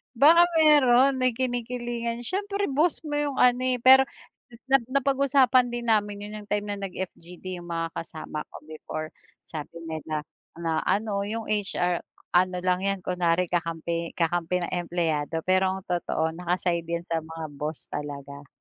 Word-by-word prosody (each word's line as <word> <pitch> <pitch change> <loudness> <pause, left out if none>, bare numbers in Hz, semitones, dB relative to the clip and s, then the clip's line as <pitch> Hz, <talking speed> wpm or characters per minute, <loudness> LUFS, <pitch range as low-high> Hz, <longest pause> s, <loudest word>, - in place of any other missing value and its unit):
Baka 330 +7 +7
mayro'n, 275 -4 +5
may 255 -2 +2
kinikilingan, 240 -1 -3
siyempre 400 - -2
boss 310 +6 +2
mo 295 -2 -2
'yong 290 -2 -1
ano, 250 0 +4
eh. 250 -2 0
Pero 265 +1 +8 0.4
is 235 0 -17
na 270 - +7
napag-usapan 270 -1 +3
din 235 -1 -2
namin 205 -1 +1
'yon, 210 +1 -7
'yong 205 - -11
time 205 0 -2
na 200 - -3
nag-FGD 180 0 -7
'yong 175 - -10
mga 165 -1 -2
kasama 155 -2 -6
ko - - -12
before. 155 0 -6 0.3
Sabi 165 +2 -8
nila 155 -1 -4 0.3
na, 165 -1 -1
ano, 200 -1 0
yung 225 +1 -4
HR, 190 -4 0 0.3
ano 180 +1 +3
lang 185 +1 +1
'yan, 195 -2 -1
kunwari 180 -1 +1
kakampi 170 0 -2
kakampi 175 +1 0
ng - - -3 0.2
empleyado. 160 -2 -1
Pero 185 0 +2
ang 190 - -7
totoo 170 -3 -1
naka-side 175 0 -1
'yan 170 0 -2
sa 165 - +1
mga 160 -1 -7
boss 150 +2 -4
talaga. 140 -1 -6
185 Hz, 160 wpm, -26 LUFS, 165-245 Hz, 0.4 s, Pero